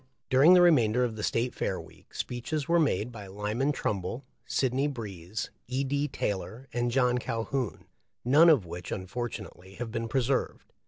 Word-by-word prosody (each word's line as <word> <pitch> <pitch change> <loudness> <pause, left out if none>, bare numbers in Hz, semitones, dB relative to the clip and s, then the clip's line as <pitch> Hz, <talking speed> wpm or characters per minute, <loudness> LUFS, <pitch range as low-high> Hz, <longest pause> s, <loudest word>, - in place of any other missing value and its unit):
During 145 +8 +7
the 180 - +7
remainder 125 -8 +4
of 120 -3 -1
the 110 - -6
State 115 +3 0
Fair - - -2
week, - - -15
speeches 140 +4 -3
were 170 0 +4
made 125 - +1
by 105 -4 -9
Lyman 105 +8 -1
Trumbull, 105 0 -3 0.2
Sidney 135 +2 +1
Breese, 105 - -5 0.2
E. 130 +3 -1
D. 140 +2 0
Taylor, 110 +1 -4
and 120 0 0
John 125 0 +2
Calhoun, 115 - -3 0.4
none 150 +7 +7
of 135 - +5
which 85 +1 -7
unfortunately 95 -2 -6
have 115 0 -5
been 115 0 -2
preserved. 130 +3 -1
120 Hz, 160 wpm, -29 LUFS, 105-135 Hz, 0.4 s, During